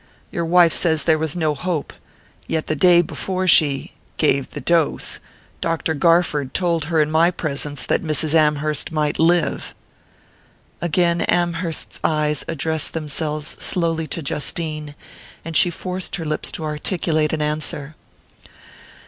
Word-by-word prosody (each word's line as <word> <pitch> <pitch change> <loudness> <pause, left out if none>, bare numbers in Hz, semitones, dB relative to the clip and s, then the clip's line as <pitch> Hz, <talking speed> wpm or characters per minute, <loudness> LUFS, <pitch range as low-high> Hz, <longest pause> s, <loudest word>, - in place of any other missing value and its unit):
Your 170 - -2
wife 170 0 +5
says 160 -4 +4
there 160 -2 +2
was 160 0 -2
no 160 -3 0
hope; 160 +1 -3 0.5
yet 160 -1 -1
the 155 - -2
day 175 +3 +5
before 185 +3 -3
she...gave 140 -3 +2
the - - -7
dose, 170 -3 0 0.4
Dr. 165 -1 -1
Garford 155 -4 +1
told 170 -4 +1
her 160 0 0
in 150 0 +2
my 165 +2 +4
presence 145 -4 -1
that - - +1
Mrs. 155 -1 -1
Amherst 150 -1 +1
might 150 -2 -1
live." 170 +1 +1 1.1
Again 170 0 +1
Amherst's 170 -1 -1
eyes 150 -1 0
addressed 160 0 -2
themselves 155 0 -2
slowly 165 -3 +1
to 165 - -4
Justine; 155 0 -2 0.5
and 165 -1 -6
she 175 - +6
forced 180 +2 -4
her 170 -4 -5
lips 155 0 -2
to - - -5
articulate 155 0 -1
an 160 - -2
answer. 150 -1 -2
160 Hz, 135 wpm, -20 LUFS, 150-170 Hz, 1.1 s, she